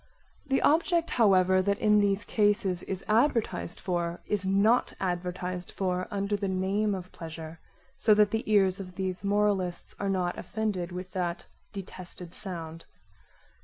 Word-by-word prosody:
The 270 Hz, 0 st, +1 dB
object 335 Hz, +2 st, +3 dB
however 190 Hz, -5 st, +4 dB
that 200 Hz, +1 st, +1 dB
in 210 Hz, -1 st, +4 dB
these 200 Hz, 0 st, +1 dB
cases 205 Hz, -4 st, +2 dB
is 190 Hz, -1 st, -5 dB
advertised 225 Hz, -, +1 dB
for 175 Hz, -1 st, -2 dB
is 200 Hz, -2 st, -1 dB
not 205 Hz, +5 st, +3 dB
advertised 180 Hz, 0 st, -3 dB
for 185 Hz, -1 st, -2 dB
under 200 Hz, 0 st, -1 dB
the 200 Hz, -1 st, -2 dB
name 195 Hz, +2 st, 0 dB
of 185 Hz, -1 st, -8 dB
pleasure, 160 Hz, -1 st, -8 dB, 0.4 s
so 215 Hz, -, +4 dB
that 210 Hz, -1 st, +4 dB
the 220 Hz, +1 st, 0 dB
ears 195 Hz, -2 st, +4 dB
of 185 Hz, -2 st, -8 dB
these 185 Hz, 0 st, -3 dB
moralists 200 Hz, -3 st, 0 dB
are 200 Hz, -, -1 dB
not 180 Hz, -2 st, -1 dB
offended 205 Hz, -5 st, -3 dB
with 180 Hz, +1 st, -6 dB
that 175 Hz, -2 st, -3 dB, 0.3 s
detested 185 Hz, -3 st, -8 dB
sound. 165 Hz, -4 st, -4 dB
190 Hz, 145 wpm, -28 LUFS, 180-205 Hz, 0.4 s, however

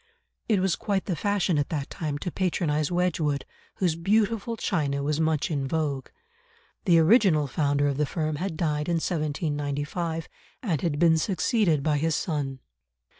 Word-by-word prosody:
It 210 Hz, -4 st, +4 dB
was 185 Hz, -2 st, +2 dB
quite 200 Hz, -3 st, -1 dB
the 180 Hz, -, -1 dB
fashion 190 Hz, -2 st, +1 dB
at 145 Hz, -, -1 dB
that 145 Hz, -4 st, -3 dB
time 150 Hz, -3 st, -3 dB
to 180 Hz, -, -1 dB
patronise 155 Hz, -5 st, 0 dB
Wedgwood, 170 Hz, -5 st, 0 dB, 0.3 s
whose 180 Hz, -4 st, +1 dB
beautiful 215 Hz, +5 st, +1 dB
china 140 Hz, -8 st, -1 dB
was 150 Hz, +1 st, 0 dB
much 160 Hz, -1 st, +1 dB
in 140 Hz, -3 st, -1 dB
vogue. 145 Hz, -3 st, -1 dB, 0.8 s
The 175 Hz, -4 st, +5 dB
original 165 Hz, -, +5 dB
founder 145 Hz, +1 st, +1 dB
of 140 Hz, -1 st, -1 dB
the 150 Hz, -1 st, +1 dB
firm 155 Hz, +1 st, -2 dB
had 175 Hz, 0 st, -3 dB
died 150 Hz, -1 st, -1 dB
in 170 Hz, -, +2 dB
1795, 155 Hz, 0 st, -2 dB, 0.4 s
and 170 Hz, -, 0 dB
had 160 Hz, -4 st, 0 dB
been 160 Hz, 0 st, +4 dB
succeeded 185 Hz, -, +1 dB
by 150 Hz, -1 st, +1 dB
his 160 Hz, +1 st, +1 dB
son. 140 Hz, -6 st, -2 dB
160 Hz, 160 wpm, -26 LUFS, 145-180 Hz, 0.8 s, The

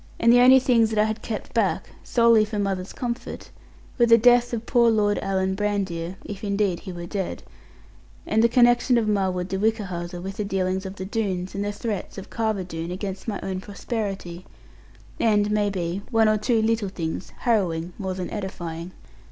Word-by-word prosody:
And 235 Hz, +1 st, +5 dB
the 245 Hz, -, +7 dB
only 255 Hz, +2 st, +8 dB
things 235 Hz, -3 st, +3 dB
that 220 Hz, -, -3 dB
I 210 Hz, -, +5 dB
had 220 Hz, +1 st, -2 dB
kept 220 Hz, -, -5 dB
back, -, -, 0 dB
solely 230 Hz, -2 st, +4 dB
for 215 Hz, 0 st, -4 dB
mother's 195 Hz, -2 st, -2 dB
comfort, 240 Hz, -2 st, -5 dB, 0.5 s
were 235 Hz, -, +5 dB
the 230 Hz, 0 st, +7 dB
death 245 Hz, +1 st, +5 dB
of 235 Hz, -1 st, -3 dB
poor 235 Hz, -2 st, +4 dB
Lord 210 Hz, -2 st, +2 dB
Alan 190 Hz, -1 st, 0 dB
Brandir 190 Hz, -4 st, -2 dB
(if 200 Hz, -1 st, -7 dB
indeed 200 Hz, -3 st, 0 dB
he 185 Hz, -, -8 dB
were 175 Hz, -1 st, -7 dB
dead) 190 Hz, +1 st, -4 dB, 0.8 s
and 220 Hz, +1 st, +2 dB
the 235 Hz, -, +5 dB
connection 240 Hz, +1 st, +4 dB
of 225 Hz, -2 st, +1 dB
Marwood 190 Hz, -3 st, 0 dB
de 190 Hz, 0 st, -3 dB
Whichehalse 195 Hz, -5 st, -1 dB
with 190 Hz, +3 st, -6 dB
the 210 Hz, -, -1 dB
dealings 190 Hz, -1 st, -1 dB
of 190 Hz, -, -8 dB
the 185 Hz, -, -6 dB
Doones, 190 Hz, -3 st, -2 dB
and 200 Hz, -, -2 dB
the 205 Hz, -, -2 dB
threats 205 Hz, -1 st, -5 dB
of 195 Hz, -, -9 dB
Carver 220 Hz, -4 st, -1 dB
Doone 165 Hz, -1 st, -6 dB
against 190 Hz, +2 st, -5 dB
my 210 Hz, -3 st, -2 dB
own 185 Hz, -1 st, -3 dB
prosperity; 195 Hz, -4 st, -5 dB, 0.8 s
and, 210 Hz, -2 st, +2 dB
may 210 Hz, -1 st, +2 dB
be, 180 Hz, -1 st, -3 dB
one 225 Hz, -2 st, +4 dB
or 215 Hz, 0 st, +3 dB
two 225 Hz, 0 st, +1 dB
little 225 Hz, -2 st, +1 dB
things 170 Hz, -2 st, -4 dB
harrowing 180 Hz, -8 st, 0 dB
more 190 Hz, -2 st, -3 dB
than 185 Hz, -1 st, -5 dB
edifying. 175 Hz, -4 st, -5 dB
205 Hz, 190 wpm, -24 LUFS, 185-225 Hz, 0.8 s, only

